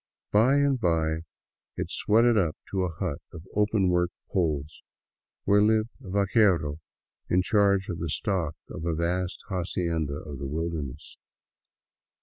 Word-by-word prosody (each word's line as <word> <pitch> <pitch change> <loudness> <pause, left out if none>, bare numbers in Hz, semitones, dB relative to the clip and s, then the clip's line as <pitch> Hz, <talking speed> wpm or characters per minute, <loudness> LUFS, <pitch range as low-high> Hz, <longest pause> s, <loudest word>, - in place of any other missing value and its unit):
By 115 +7 +5
and 140 -2 +3
by 80 -3 +1 0.6
it - - -3
sweated 115 +2 +4
up 85 -6 +1
to 95 -2 +1
a 90 - -3
hut 80 -3 -3
of 80 +1 -10
open 105 -2 +2
work 90 0 +2 0.2
poles, 75 -5 -1 0.6
where 100 +1 +4
lived 110 +1 +3
a - - -9
vaquero 95 -6 +2 0.5
in 90 +1 +3
charge 100 -1 +3
of 85 -5 -4
the 85 - -3
stock 90 -3 -1 0.2
of 80 - -6
a 85 -1 0
vast 90 +2 -2
hacienda 85 -5 -1
of 75 -2 -7
the 70 - -4
wilderness. 75 -3 -4
90 Hz, 140 wpm, -27 LUFS, 80-100 Hz, 0.6 s, By